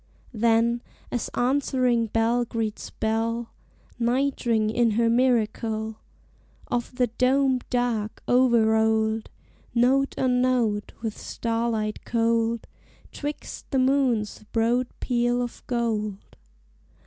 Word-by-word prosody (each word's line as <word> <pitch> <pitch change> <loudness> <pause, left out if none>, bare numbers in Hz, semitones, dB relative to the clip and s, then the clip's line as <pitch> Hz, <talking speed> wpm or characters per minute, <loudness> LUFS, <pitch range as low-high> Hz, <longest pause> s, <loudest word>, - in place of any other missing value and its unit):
Then, 230 +1 +2 0.3
as 245 - -2
answering 250 -2 +1
bell 230 +3 +1
greets 225 -2 -4
bell, 225 +1 -2 0.5
Night 255 +3 0
ring 220 -2 +2
in 235 0 +2
her 230 0 +3
miracle 225 -3 +1 0.7
Of 245 +1 -2
the 250 -1 +1
doméd 260 +2 +2
dark, 240 -4 -1
o'er 245 -2 +4
rolled, 220 0 +1 0.5
Note 265 +3 +3
on 250 -1 +2
note, 235 -5 +1
with 220 -2 -2
starlight 230 -2 -2
cold, 230 0 +1 0.5
'Twixt 295 0 -6
the 270 - 0
moon's 255 -6 +1
broad 235 +2 +2
peal 240 -1 +1
of 245 -1 -4
gold. 220 -4 -1
235 Hz, 105 wpm, -25 LUFS, 225-250 Hz, 0.7 s, o'er